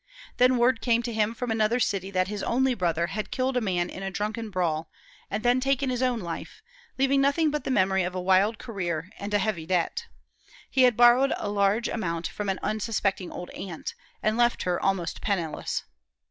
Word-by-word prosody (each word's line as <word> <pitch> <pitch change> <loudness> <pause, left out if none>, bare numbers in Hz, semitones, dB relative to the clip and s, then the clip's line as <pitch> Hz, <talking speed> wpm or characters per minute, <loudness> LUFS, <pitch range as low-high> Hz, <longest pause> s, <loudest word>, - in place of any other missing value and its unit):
Then 250 +1 +5
word 240 0 +3
came 235 -1 +2
to 235 0 -3
him 220 +1 0
from 245 0 -3
another 220 +2 +2
city 195 -5 0
that 185 -1 +1
his 205 0 -4
only 260 +2 +2
brother 170 -6 0
had 210 +4 -4
killed 260 0 -1
a 250 - +2
man 180 -5 0
in 190 - -8
a 195 - -2
drunken 215 +3 -3
brawl, 165 -4 -1 0.4
and 210 +2 -3
then 245 +1 +4
taken 270 0 +1
his 250 0 -2
own 250 -2 +1
life, 175 - -7 0.3
leaving 270 +1 +3
nothing 290 +3 +3
but 300 0 -3
the - - -2
memory 190 -6 +3
of 180 0 -2
a - - -1
wild 190 +4 +3
career 180 -6 -4
and 200 +1 -5
a 205 - +3
heavy 190 -6 -2
debt. 185 - 0 0.6
He 265 - +3
had 245 -3 +3
borrowed 245 +3 +6
a 205 - -3
large 205 +3 +2
amount 170 -6 -2
from 205 +4 -3
an 190 - 0
unsuspecting 210 -3 -1
old 180 - -7
aunt, 175 -5 -6 0.3
and 215 +1 +1
left 240 0 +2
her 180 -1 0
almost 195 -3 -1
penniless. 175 -7 -2
210 Hz, 200 wpm, -27 LUFS, 185-245 Hz, 0.6 s, borrowed